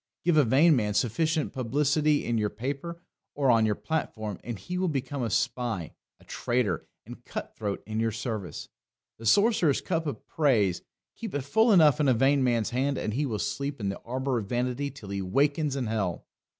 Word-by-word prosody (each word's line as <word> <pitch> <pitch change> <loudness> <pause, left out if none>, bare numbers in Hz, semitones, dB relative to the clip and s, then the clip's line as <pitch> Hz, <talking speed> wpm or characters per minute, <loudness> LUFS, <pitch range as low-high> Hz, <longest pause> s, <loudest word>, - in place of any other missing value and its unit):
Give 175 -1 +3
a 150 - +6
vain 145 +7 +5
man 105 -4 0
sufficient 155 +8 0
publicity 145 +4 +1
in 120 -1 0
your 105 -1 0
paper 140 +10 -5 0.3
or 140 -3 +3
on 115 -2 +4
your 105 - +1
platform 110 - -3
and 120 -3 -5
he 180 - -5
will 185 - +1
become 140 -2 -2
a 115 - -1
spy, 110 -5 -1 0.3
a - - -20
traitor, 120 -8 -1 0.2
and - - -11
cut - - -6
throat 100 -2 -4
in 110 +1 -3
your 115 0 +2
service. 110 - -5 0.5
The 115 - -4
sorcerer's 200 - +4
cup 165 -3 -2
of 130 -7 -5
praise 110 - +2 0.3
keep 225 -7 -6
it 145 - -1
full 220 - +3
enough 155 -6 +6
in 150 - +3
a 130 - +4
vain 135 +3 +3
man's 120 -3 +1
hand, 135 +3 0
and 110 - -2
he 145 +4 0
will 110 -4 -2
sleep 140 +8 -3
in 100 -2 -1
the 100 - -4
arbour 130 +1 -2
of 105 - -6
vanity 125 +3 -1
till 120 -8 -11
he 100 0 -3
wakens 140 - +1
in 135 -3 -2
hell. 105 -6 -2
130 Hz, 200 wpm, -28 LUFS, 110-145 Hz, 0.5 s, a